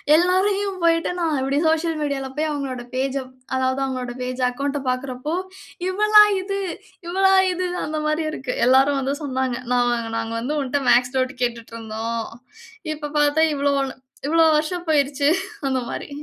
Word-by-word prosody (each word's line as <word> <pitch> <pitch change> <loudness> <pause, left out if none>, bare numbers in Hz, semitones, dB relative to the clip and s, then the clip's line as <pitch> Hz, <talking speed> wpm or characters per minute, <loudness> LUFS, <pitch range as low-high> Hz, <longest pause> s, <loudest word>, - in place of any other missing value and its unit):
எல்லாரையும் 380 +3 +2
போயிட்டு 330 +1 +3
நான் 320 -4 0
இப்டி 275 +2 +1
சோசியல் 320 0 +1
மீடியால 275 -2 -2
போய் 310 0 0
அவங்களோட 265 -4 -4
பேஜ்ஜ 270 +1 0 0.4
அதாவது 260 +1 0
அவங்களோட 255 -2 -4
பேஜ் 255 +1 -4
அக்கவுண்ட்ட 280 +2 -3
பாக்கறப்போ 255 +4 -3 0.5
இவளா 425 +2 +6 0.2
இது! 395 +1 -3 0.5
இவளா 385 +2 +3 0.2
இது! 360 0 -2 0.2
அந்த 310 0 -3
மாரி 305 +1 0
இருக்கு. 260 -4 -4
எல்லாரும் 270 +2 +4
வந்து 270 +2 -1
சொன்னாங்க. 260 -2 -1
நா 245 - +3 0.4
நாங்க 225 0 -3
வந்து 290 +6 -2
உன்ட்ட 275 +1 -1
மேத்ஸ் 250 +2 +3
நோட்டு 255 +1 0
கேட்டுட்ருந்தோம். 230 -1 -4 0.7
இப்ப 295 -1 -6
பாத்தா 295 +2 +3
இவ்ளோ 280 0 +1
வள 270 -1 -1 0.4
இவ்வளோ 325 +2 +4
வருஷம் 340 +3 -3
போயிருச்சு! 285 -1 +2 0.4
அந்த 260 -1 +1
மாரி. - - -5
280 Hz, 150 wpm, -22 LUFS, 255-320 Hz, 0.7 s, இவளா